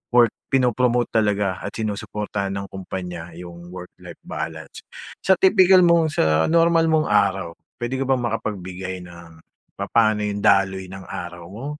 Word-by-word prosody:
work 120 -1 +6 0.2
pinopromote 125 -1 +1
talaga 105 -4 +1
at 100 - -7
sinusuportahan 105 -2 -3
ng 100 0 -6
kumpanya 90 -3 -7
yung 85 0 -10
work 90 0 -9
life - - -11
balance. 80 0 -6 0.4
Sa 190 - +3
tipikal 190 -1 +5
mong 165 -2 +3
sa 80 0 +2
normal 165 0 +3
mong 155 -1 +1
araw, 95 -3 +2 0.2
pwede 125 +2 -3
ka 135 - -2
bang 130 -2 +1
makapagbigay 95 -5 -4
ng 85 -2 -14 0.3
papaano 110 -2 +1
yung 105 0 -2
daloy 95 -1 +2
ng 95 +1 -9
araw 85 -1 -7
mo, 115 +7 -8
100 Hz, 145 wpm, -22 LUFS, 90-125 Hz, 0.4 s, work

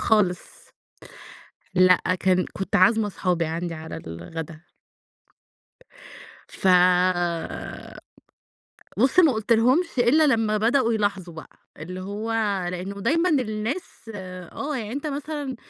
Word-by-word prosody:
خالص، 200 -5 0 1.0
لأ 185 0 +5 0.2
كان، 185 -1 +2
كنت 195 - -1
عازمة 215 +4 +4
اصحابي 180 -4 -1
عندي 165 +1 -4
على 160 0 -8
الغدا. 155 - -7 1.9
ف 190 - -2 2.3
بُصّ 260 +9 +2
ما 320 -6 +5
قُلتلهمش 235 - +2
إلّا 270 +6 +4
لمّا 225 -6 +2
بدأوا 235 +2 +2
يلاحظوا 200 -5 -2
بقى، 160 - -10 0.3
اللي 180 +4 -7
هو 205 +4 -4 0.4
لإنه 190 +3 -6
دايمًا 330 - +2
الناس، 235 -1 -3
آه 185 - -6
يعني 220 -3 -5
أنت 285 +4 -4
مثلًا 290 -2 -4
210 Hz, 105 wpm, -24 LUFS, 180-255 Hz, 2.3 s, لأ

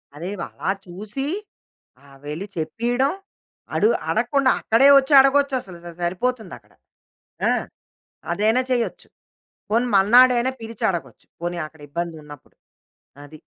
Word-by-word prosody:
అదే 170 +5 -6
వ - - -4
అలా 190 - -2
చూసి, 210 +9 -6 0.8
ఆహ్, 140 -1 -17
వెళ్ళి 155 +7 -5
చెప్పియడం, 240 - 0 0.7
అడు 435 - +4 0.2
అడగకుండా, 275 -2 +2
అక్కడే 230 +5 +4
ఒచ్చడగొచ్చసలు 270 - +3
స - - -7
స - - -28
సరిపోతుందక్కడ. 220 +4 -3 0.8
ఆ! - - +3 0.8
అదైనా 220 +4 +2
చెయ్యొచ్చు. 240 -2 -2 0.6
పోనీ 230 +3 +2
మర్నాడయినా 245 +5 +5
పిలిచడగొచ్చు. 215 -6 -4
పోనీ 175 +1 -3
అక్కడిబ్బందున్నప్పుడు. 150 -1 -8 0.7
అది. 155 +1 -14
215 Hz, 100 wpm, -22 LUFS, 170-255 Hz, 0.8 s, మర్నాడయినా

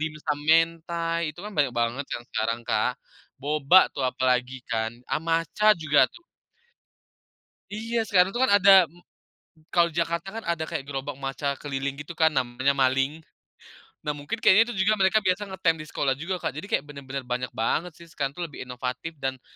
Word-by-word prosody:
dimsum 150 -1 -3
mentai. 165 0 +2
Itu 175 +6 -11
kan, 210 - -7
banyak 140 -4 +2
banget 120 +4 0
kan, - - -4
sekarang 115 +2 -1
Kak, 125 +3 0 0.4
boba 150 +6 +4
tuh - - -6
apalagi 125 0 0
kan, 110 0 -1 0.2
ah, - - +1
matcha 165 +6 +2
juga 155 -3 +3
tuh. 345 - -17 1.5
Iya, 225 +3 -2
sekarang 190 -3 +3
itu 240 - -1
kan 260 - +4
ada. 195 -4 +7 0.8
Kalau 170 -1 +4
di 165 - -14
Jakarta 170 +2 -1
kan, 225 - -6
ada 165 -2 -2
kayak 160 -5 -4
gerobak 140 0 -5
matcha 140 +1 -3
keliling 135 -1 -4
gitu 145 +4 -8
kan, 160 0 +4
namanya 130 -1 0
maling. 135 +4 +1 0.8
Nah, 150 - 0
mungkin 145 +10 -5
kayaknya 220 +2 +5
itu 190 -5 -1
juga 215 - +4
mereka 190 +2 +4
biasa 190 +2 0
ngetem 190 -3 +1
di - - -8
sekolah 135 -2 0
juga 170 +7 -4
Kak. 155 - -3
Jadi, 160 +8 -8
kayak - - +1
benar-benar 140 -2 -7
banyak 125 0 -2
banget 155 +9 -2
sih, 170 - -13
sekarang 145 -4 -3
tuh 175 - -2
lebih 150 - -9
inovatif 125 +5 -5
dan 135 -2 -4
150 Hz, 180 wpm, -26 LUFS, 135-175 Hz, 1.5 s, ada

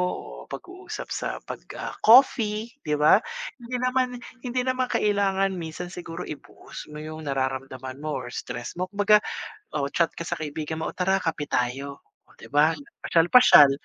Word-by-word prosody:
o - - -8 0.3
pag-uusap - - -7
sa - - -2 0.2
'pag, - - -7 0.2
ah, - - -5
coffee 225 -2 +5 0.2
'di 150 - +2
ba? 150 +6 +6 0.4
Hindi 240 +1 -5
naman 255 0 +2 0.3
hindi 250 0 -1
naman 255 0 0
kailangan 195 -2 +2
minsan 175 0 -6
siguro 175 0 -6
i-post 150 - -9
mo 150 - -9
yung 155 0 -7
nararamdaman 130 -1 -3
mo 155 -1 -2
or 120 - -8
stress 120 -1 -5
mo, 185 - 0
kumbaga 205 +1 +5 0.5
o 145 -2 0
chat 165 +3 +1
ka 170 - -7
sa - - 0
kaibigan 155 +1 -4
mo, - - -2
"Oh, - - -38
tara 190 +1 +2
kape 155 -3 -2
tayo." 135 +3 -2 0.3
Oh - - -22
'di 115 - -13
ba, 150 +3 +5 0.3
pasyal-pasyal. 165 - +7
165 Hz, 165 wpm, -25 LUFS, 145-205 Hz, 0.5 s, pasyal-pasyal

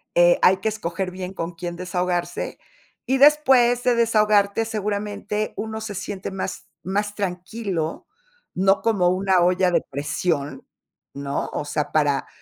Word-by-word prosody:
Eh, 175 0 +5
hay 190 +1 +5
que 205 - -3
escoger 190 -3 -3
bien 185 +1 -6
con 170 -1 -4
quién 175 0 -6
desahogarse, 180 -1 -2 0.5
y 265 +2 +1
después 260 -4 +5
de 250 -1 +3
desahogarte, 215 -2 +3
seguramente 210 0 -3
uno 220 0 -4
se 210 -2 -5
siente 195 +1 -5
más 190 0 -5 0.2
más 205 +2 -1
tranquilo, 185 -3 -3 0.5
no 195 +2 +3
como 200 -6 +2
una 185 -1 +2
olla 180 +1 +3
de - - +2
presión, 145 0 -2 0.5
¿no? 140 0 -3
O - - -2
sea, 145 0 -3
para, 145 -3 +1
190 Hz, 140 wpm, -23 LUFS, 175-215 Hz, 0.5 s, Eh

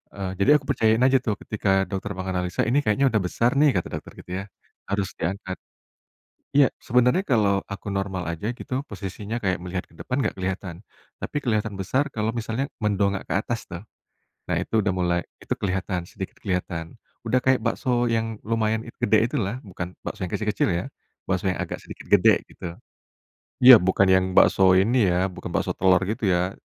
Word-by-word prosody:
eee, 95 -2 -3
jadi 100 - +3
aku 145 - +1
percayain 115 -2 +3
aja 130 0 +5
tuh 110 -4 -2
ketika 95 -2 +1
dokter 100 0 -4
menganalisa, 90 -1 -2
"Ini 130 +5 +2
kayaknya 135 +2 +2
udah 110 - +2
besar 120 +6 +1
nih" 145 -6 +4
kata 90 - 0
dokter - - -14
gitu - - -13
ya, 95 - -5 0.4
"harus 100 0 -1
diangkat," 95 +2 -3 1.0
iya 140 -4 +6
sebenarnya 125 - +2
kalau 105 -6 +3
aku 100 +1 -6
normal 95 -3 -2
aja 105 +8 -3
gitu 130 +3 -4
posisinya 105 +3 -6
kayak 95 -3 0
melihat 90 +1 -4
ke - - -23
depan 130 +2 -2
enggak - - -2
kelihatan, 95 -1 -3 0.4
tapi - - -6
kelihatan 110 -4 0
besar 130 +9 0
kalau 110 0 0
misalnya 115 +3 -3
mendongak 100 -3 0
ke - - -3
atas 110 +4 -2
tuh, 85 +1 -8 0.7
nah - - 0
itu 110 - +1
udah 100 -2 0
mulai 90 -1 +1 0.2
itu - - -5
kelihatan 95 -2 -2
sedikit 95 - -8
kelihatan 85 -3 -3 0.3
udah 130 - +2
kayak 130 -1 +2
bakso 120 +1 0
yang 115 -1 -2
lumayan 110 0 0 0.2
gede 110 +2 +3
itulah, 115 +5 -2
bukan 90 -2 -7
bakso 90 - -4
yang - - -10
kecil-kecil 105 -1 0
ya, 85 - -1 0.4
bakso 95 +1 -2
yang 95 - +2
agak - - -5
sedikit - - -11
gede - - +5
gitu, - - -9 0.9
iya 125 -1 +11
bukan 95 0 +3
yang 95 0 +5
bakso 95 0 +5
ini 115 +3 +3
ya 90 +2 +1
bukan 90 - -8
bakso - - -1
telor 95 -1 +4
gitu 110 +1 -3
ya, 90 +2 0
100 Hz, 180 wpm, -24 LUFS, 95-115 Hz, 1.0 s, iya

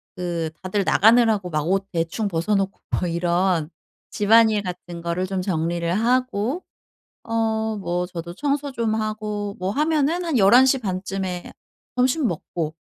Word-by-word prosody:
그 170 -3 -2
다들 190 +2 -1
나가느라고 220 -4 +4
막 155 0 -1
옷 195 +1 0
대충 170 +5 -1
벗어 170 +3 -1
놓고 195 0 -1 0.2
뭐 180 - 0
이런 170 -1 +1 0.4
집안일 220 0 +4
같은 175 -1 -7
거를 170 +2 -1
좀 190 -1 -2
정리를 170 -2 -1
하고 250 - 0 0.6
어 220 -1 -1
뭐 180 -2 -2
저도 170 -1 -7
청소 285 +1 -1
좀 225 -3 -1
하고 210 -2 -3
뭐 185 +1 -1
하면은 310 +5 +1
한 320 -7 +1
11 235 +6 +7
시 265 0 +3
반쯤에 190 -3 -4 0.4
점심 255 +2 +2
먹고 160 -2 -4
200 Hz, 250 characters per minute, -23 LUFS, 175-230 Hz, 0.6 s, 11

